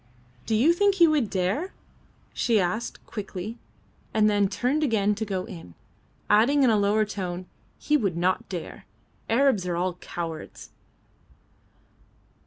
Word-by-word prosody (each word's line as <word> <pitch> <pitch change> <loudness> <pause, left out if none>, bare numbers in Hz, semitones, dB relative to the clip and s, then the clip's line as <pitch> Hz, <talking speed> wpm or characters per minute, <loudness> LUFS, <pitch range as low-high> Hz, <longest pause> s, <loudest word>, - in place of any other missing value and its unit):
"Do 220 - +1
you 280 +10 +5
think 400 +2 +3
he 340 -3 +6
would 295 -9 +1
dare?" 195 - -1 0.6
she 230 -4 +2
asked, 190 +5 -2
quickly, 210 +1 -6 0.6
and 215 -1 +4
then 205 -1 +3
turned 250 +10 0
again 210 -6 +2
to 220 +2 -3
go 190 -3 -3
in, 90 - -11 0.5
adding 245 +7 +4
in 250 - +5
a 215 - +3
lower 210 +2 +2
tone, 185 -3 -5 0.3
"He 300 - +2
would 195 - -1
not 180 +2 0
dare. 180 -4 -7 0.4
Arabs 230 -6 +3
are 175 - -1
all 180 +1 0
cowards." 170 -2 -7
210 Hz, 140 wpm, -26 LUFS, 185-245 Hz, 0.6 s, he